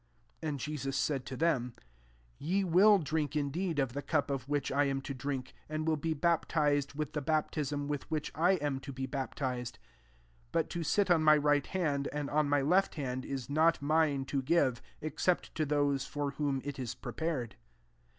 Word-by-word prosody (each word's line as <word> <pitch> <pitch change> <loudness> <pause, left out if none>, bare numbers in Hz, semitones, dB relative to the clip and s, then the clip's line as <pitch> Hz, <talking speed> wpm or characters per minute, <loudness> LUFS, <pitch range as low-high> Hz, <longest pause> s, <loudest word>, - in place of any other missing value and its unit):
And 150 -3 -2
Jesus 135 -2 -3
said 135 -1 -1
to. 130 - -5
them, 130 -8 +1 0.3
" - - -31 0.3
Ye 185 +6 +1
will 195 +4 +6
drink 155 -3 -2
in 145 -2 0
deed 170 0 -2
of 135 -4 0
the 145 - -3
cup 145 -1 0
of 135 -1 -3
which 145 -1 0
I 145 +1 +3
am 135 -1 0
to 140 - -5
drink; 130 -1 -4 0.2
and 155 0 -2
will 160 - +3
be 160 +2 -2
baptized 150 -3 +1
with 155 0 -3
the 150 - -1
baptism 145 -1 -1
with 145 -2 -4
which 155 -2 -2
I 175 +5 +3
am 145 -6 -1
to 140 +1 -8
be 130 0 -4
baptia^: 130 0 -2
40 125 0 -6 0.7
but, 165 -1 0
to 175 - -3
sit 195 +4 +2
on 165 -2 +4
my 155 0 +7
right 145 -1 +2
hand, 145 -7 -1
and 145 -1 -3
on 150 0 +2
my 145 0 +3
left 185 +7 +3
hand, 130 -3 -3
is 135 -3 -4
not 160 +3 +3
mine 145 -2 +2
to 135 0 -1
give, 130 -4 +2 0.2
except 155 +4 0
to 155 -2 -1
those 145 -2 +1
for 145 -1 -2
whom 140 -2 -1
it 145 -1 -5
is 125 -3 -4
prepared." 150 -9 -3
145 Hz, 200 wpm, -32 LUFS, 135-155 Hz, 0.7 s, my